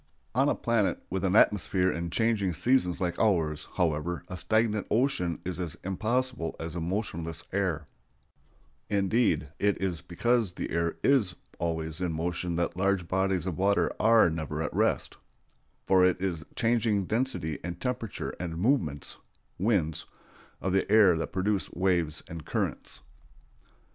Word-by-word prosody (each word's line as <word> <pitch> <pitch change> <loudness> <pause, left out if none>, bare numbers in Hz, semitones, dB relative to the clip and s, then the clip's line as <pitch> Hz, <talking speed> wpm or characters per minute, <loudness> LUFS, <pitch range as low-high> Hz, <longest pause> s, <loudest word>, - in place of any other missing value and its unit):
On 135 +4 +3
a - - +2
planet 115 -4 +1
with 95 0 -2
an 95 0 +2
atmosphere 95 -3 +4
and 85 0 -4
changing 105 -2 +1
seasons 105 -5 +2
like 90 -2 -2
ours, 80 -8 +1
however, 85 0 0
a 90 - -5
stagnant 110 +3 +1
ocean 110 - +1
is 90 -1 -3
as 85 -1 -4
impossible 110 0 -1
as 80 0 -5
a 85 - -2
motionless 85 -3 -3
air; 90 -6 0 1.0
indeed, 100 -6 +2
it 100 0 +2
is 90 -4 -2
because 115 +2 0
the - - -4
air 85 0 0
is 110 -11 +3 0.2
always 80 0 -2
in 90 -2 0
motion 85 +2 -2
that 85 0 -1
large 95 -1 +1
bodies 95 0 0
of 90 -3 -3
water 100 +1 +2
are 115 -1 +6
never 80 -1 -3
at 75 - -3
rest, - - 0 0.7
for 95 -1 +5
it 90 0 +3
is 90 -3 -1
the 75 - -15
changing 115 -5 +2
density 110 - -1
and 85 0 -5
temperature 125 -4 -3
and 85 -2 -4
movements 85 - 0 0.4
(winds) 90 -7 +1 0.5
of 95 - -1
the 95 +1 +1
air 105 -5 +7
that 80 - -3
produce 95 +1 0
waves 85 -4 0
and 80 -1 -7
currents. - - -2
90 Hz, 150 wpm, -29 LUFS, 85-105 Hz, 1.0 s, air